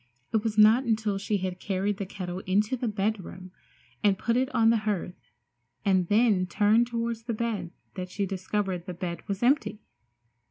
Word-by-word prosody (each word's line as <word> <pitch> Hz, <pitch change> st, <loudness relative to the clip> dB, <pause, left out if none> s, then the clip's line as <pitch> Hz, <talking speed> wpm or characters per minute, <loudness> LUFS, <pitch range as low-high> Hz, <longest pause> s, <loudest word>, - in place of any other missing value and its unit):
It 220 Hz, -1 st, +2 dB
was 220 Hz, -2 st, -2 dB
not 220 Hz, +4 st, +7 dB
until 220 Hz, -4 st, 0 dB
she 205 Hz, +1 st, 0 dB
had 185 Hz, -1 st, -4 dB
carried 195 Hz, +1 st, -1 dB
the 200 Hz, -, -4 dB
kettle 185 Hz, -2 st, -5 dB
into 210 Hz, +6 st, +2 dB
the 245 Hz, -1 st, -3 dB
bedroom 195 Hz, -3 st, -3 dB, 0.5 s
and 200 Hz, -2 st, +4 dB
put 230 Hz, +3 st, 0 dB
it 260 Hz, +1 st, +1 dB
on 230 Hz, -5 st, +4 dB
the 230 Hz, -, +3 dB
hearth 185 Hz, -3 st, -4 dB, 0.6 s
and 185 Hz, -3 st, +3 dB
then 205 Hz, -3 st, +3 dB
turned 215 Hz, +5 st, +3 dB
toward 235 Hz, -1 st, -2 dB
the 230 Hz, -, -1 dB
bed 215 Hz, -6 st, -2 dB, 0.2 s
that 185 Hz, -1 st, -5 dB
she 200 Hz, +2 st, -2 dB
discovered 190 Hz, -1 st, -3 dB
the 180 Hz, -, -5 dB
bed 175 Hz, -1 st, -4 dB
was 200 Hz, +1 st, -3 dB
empty! 255 Hz, -4 st, +2 dB
205 Hz, 175 wpm, -27 LUFS, 185-225 Hz, 0.6 s, not